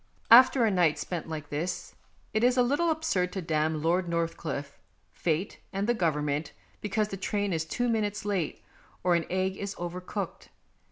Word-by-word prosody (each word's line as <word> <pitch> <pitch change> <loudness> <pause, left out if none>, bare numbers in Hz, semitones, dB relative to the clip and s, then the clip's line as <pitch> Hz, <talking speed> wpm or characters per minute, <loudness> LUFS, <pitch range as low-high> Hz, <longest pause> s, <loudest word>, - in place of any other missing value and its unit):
After 250 +1 +8
a 220 - +3
night 170 -5 +3
spent 165 0 -4
like 150 -2 -5
this 165 +5 -3 0.4
it 215 +1 +1
is 250 +1 +4
a 250 - +6
little 290 +7 +2
absurd 310 - 0
to 195 - -2
damn 155 -1 0
Lord 175 +2 +1
Northcliffe, 165 -4 -3 0.3
Fate, 170 +3 -2
and 195 +1 -1
the 240 - +4
Government 150 -6 -1 0.3
because 210 +1 0
the 195 - -5
train 200 0 -1
is 160 -1 -1
two 245 +9 -1
minutes 210 -3 -1
late, 195 -6 -2 0.4
or 180 0 +3
an 170 -1 +1
egg 190 +1 0
is 200 0 -4
over 175 +1 -4
cooked. 190 0 -5
180 Hz, 175 wpm, -29 LUFS, 160-210 Hz, 0.4 s, After